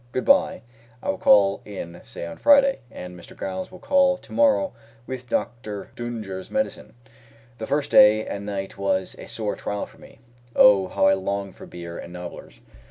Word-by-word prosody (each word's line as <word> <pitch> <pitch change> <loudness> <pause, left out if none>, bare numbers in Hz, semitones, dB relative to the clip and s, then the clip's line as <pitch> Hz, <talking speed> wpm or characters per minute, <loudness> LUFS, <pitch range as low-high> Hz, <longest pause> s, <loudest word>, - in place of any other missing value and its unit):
Good 130 - -1
bye. 280 - +3 0.4
I - - -2
will - - -7
call 100 -1 +5
in, 90 -4 -8
say - - -7
on 85 -1 -8
Friday, 275 -1 +5
and 90 -5 -9
Mr. 85 - -14
Giles 185 -1 -4
will 185 - -11
call 275 +5 +3
to - - -18
morrow 285 0 +3 0.3
with 125 -1 -7
Dr. 110 -4 -3
D'Unger's 110 -6 -6
medicine." 270 - -3 0.6
The 110 - -5
first 145 0 -1
day 110 +1 +7
and 100 - -5
night 100 -1 -5
was 95 -1 0
a - - -9
sore 110 -2 -3
trial 105 0 -4
for - - -19
me. - - -16 0.4
Oh, 100 -2 +6
how 190 - +1
I 195 - +6
longed 100 - -3
for - - -11
beer 85 -1 -8
and 85 - -9
nobblers! 90 -1 -9
105 Hz, 180 wpm, -24 LUFS, -, 0.6 s, day